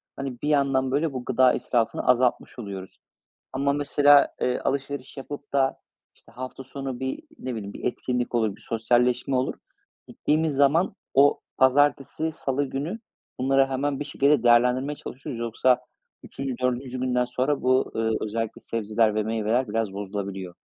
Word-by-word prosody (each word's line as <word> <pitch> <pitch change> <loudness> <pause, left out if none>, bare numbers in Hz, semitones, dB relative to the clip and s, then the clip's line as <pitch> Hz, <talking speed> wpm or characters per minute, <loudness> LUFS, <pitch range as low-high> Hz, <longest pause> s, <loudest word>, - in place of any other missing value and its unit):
hani, 135 -3 -6
bir 150 - -1
yandan, 135 -2 +2
böyle, 145 +1 0
bu 125 -1 -5
gıda 130 -1 +4
israfını 115 -3 -1
azaltmış 125 0 +2
oluyoruz 95 -3 -8 0.5
ama, 140 +1 +1
mesela, 145 0 +5
eee, 125 - +1
alışveriş 140 0 -3
yapıp 145 +1 -8
da, 135 -1 +2 0.4
işte, - - -22
hafta 130 +1 -7
sonu 135 -1 -6
bir, 130 0 -3 0.2
ne 130 -1 -4
bileyim, 100 -3 -6
bir - - -9
etkinlik 125 0 -2
olur, 110 -4 +1
bir - - -21
sosyalleşme 120 +3 +1
olur. 130 - 0 0.5
Gittiğimiz 155 0 0
zaman 145 +6 +3 0.2
o 140 +1 +5 0.2
pazartesi, 145 +3 +2
salı 140 -2 -1
günü 145 +10 -4 0.4
bunları 135 +1 +3
hemen 135 +1 -2
bir - - -2
şekilde 140 -2 +2
değerlendirmeye 125 +4 +3
çalışıyoruz. 125 -4 -7
Yoksa 120 +2 +2 0.4
3'üncü, 135 -1 -5
4'üncü 125 0 -1
günden 125 -1 +1
sonra 130 +3 -1
bu, 130 +1 +2
ııı, 110 0 +1
özellikle 110 +1 -3
sebzeler 110 -1 0
ve 110 - +1
meyveler 115 +3 0
biraz 110 -2 -1
bozulabiliyor. 95 -2 -5
130 Hz, 150 wpm, -25 LUFS, 120-140 Hz, 0.5 s, mesela